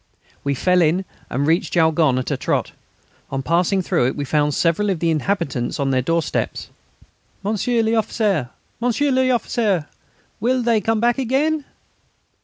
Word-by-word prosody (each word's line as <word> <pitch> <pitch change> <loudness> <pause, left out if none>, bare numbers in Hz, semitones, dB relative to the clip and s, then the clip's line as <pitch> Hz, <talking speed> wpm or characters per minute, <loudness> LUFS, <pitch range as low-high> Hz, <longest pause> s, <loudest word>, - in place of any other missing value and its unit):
We 140 0 0
fell 180 +6 +2
in 170 +4 +2 0.2
and 140 +3 -1
reached 165 +7 +1
Jaulgonne 160 -5 +3
at 130 - -2
a - - +1
trot. - - -1 0.6
On 135 0 -3
passing 180 +5 +1
through 170 -9 +1
it 130 - -2
we 145 - -3
found 150 0 +1
several 175 +5 +1
of 190 - 0
the 165 0 +1
inhabitants 155 -6 -1
on 135 -1 0
their 130 -1 +2
doorsteps: 165 +4 -2 0.7
"Monsieur 220 +3 0
l'Officier,... 215 - 0 0.3
Monsieur 245 +4 +1
l'Officier, 235 - +1 0.5
will 250 +3 +1
they 230 -2 +2
come 225 +2 0
back 240 +2 +2
again?" 280 +4 0
185 Hz, 150 wpm, -21 LUFS, 155-230 Hz, 0.7 s, Jaulgonne